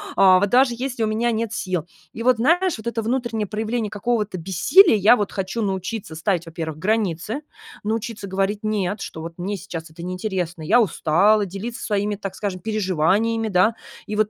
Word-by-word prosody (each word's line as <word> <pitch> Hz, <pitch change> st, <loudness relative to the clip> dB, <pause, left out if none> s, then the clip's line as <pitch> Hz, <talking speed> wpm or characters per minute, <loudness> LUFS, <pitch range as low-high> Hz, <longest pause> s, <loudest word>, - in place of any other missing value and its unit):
а 185 Hz, -1 st, +6 dB
вот 205 Hz, -, +1 dB
даже 250 Hz, +1 st, +4 dB
если 250 Hz, -2 st, -2 dB
у -, -, +2 dB
меня 230 Hz, +2 st, 0 dB
нет 225 Hz, -1 st, -2 dB
сил. 185 Hz, -6 st, -2 dB, 0.3 s
И 230 Hz, -, -5 dB
вот, 250 Hz, -2 st, +4 dB
знаешь, 340 Hz, +7 st, +2 dB
вот 220 Hz, +1 st, -8 dB
это 235 Hz, -1 st, -1 dB
внутреннее 230 Hz, -2 st, -1 dB
проявление 220 Hz, +1 st, -2 dB
какого-то 210 Hz, -2 st, -1 dB
бессилия, 195 Hz, -, +5 dB
я 215 Hz, +4 st, +5 dB
вот 205 Hz, -2 st, -2 dB
хочу 195 Hz, +4 st, -3 dB
научиться 190 Hz, -2 st, -3 dB
ставить, 175 Hz, +1 st, -1 dB
во-первых, 160 Hz, -2 st, -6 dB
границы. 210 Hz, -, -1 dB, 0.4 s
Научиться 220 Hz, -1 st, -3 dB
говорить 195 Hz, +2 st, -1 dB
"нет", 210 Hz, -2 st, -1 dB
что 160 Hz, -, -6 dB
вот 165 Hz, +1 st, -7 dB
мне 200 Hz, +3 st, -3 dB
сейчас 165 Hz, -3 st, -7 dB
это 165 Hz, +2 st, -11 dB
неинтересно, 180 Hz, -2 st, -3 dB
я 240 Hz, +10 st, +4 dB
устала, 200 Hz, +3 st, +3 dB
делиться 200 Hz, +6 st, -6 dB
своими, 205 Hz, 0 st, 0 dB
так 195 Hz, -1 st, -6 dB
скажем, 195 Hz, -3 st, -4 dB
переживаниями, 215 Hz, +3 st, +1 dB
да. 200 Hz, +4 st, +3 dB, 0.3 s
И 210 Hz, -, -3 dB
вот 215 Hz, 0 st, +2 dB
205 Hz, 180 wpm, -22 LUFS, 185-225 Hz, 0.4 s, а